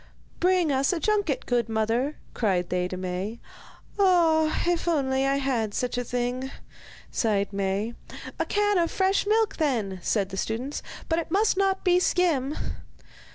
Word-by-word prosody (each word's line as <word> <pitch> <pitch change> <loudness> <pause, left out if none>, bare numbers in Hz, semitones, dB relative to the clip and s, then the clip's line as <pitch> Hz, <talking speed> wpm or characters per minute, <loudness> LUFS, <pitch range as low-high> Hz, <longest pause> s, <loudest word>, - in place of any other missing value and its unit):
'Bring 360 -3 +3
us 270 0 +2
a 355 - -1
junket, 425 +7 0
good 240 -2 0
mother,' 225 +6 0 0.2
cried 185 -6 0
they 180 0 0
to 185 - -6
Maie. 185 +5 -4 0.6
'Ah! 330 -5 +3
if 345 0 0
only 270 -4 +1
I 275 - +2
had 245 -7 -1
such 250 0 -1
a 245 - -1
thing!' 245 +2 -2 0.6
sighed 200 -3 0
Maie. 200 +3 -1 0.5
'A - - +1
can 415 -2 +2
of 335 -1 +2
fresh 385 +1 +1
milk, 435 -1 +2
then,' 225 - 0
said 200 -1 0
the 190 - -6
students; 235 +8 -3 0.3
'but 325 0 +1
it 335 - -5
must 400 +5 +2
not 385 0 +1
be 360 -1 +4
skim. 315 -7 +1
270 Hz, 155 wpm, -26 LUFS, 220-355 Hz, 0.6 s, be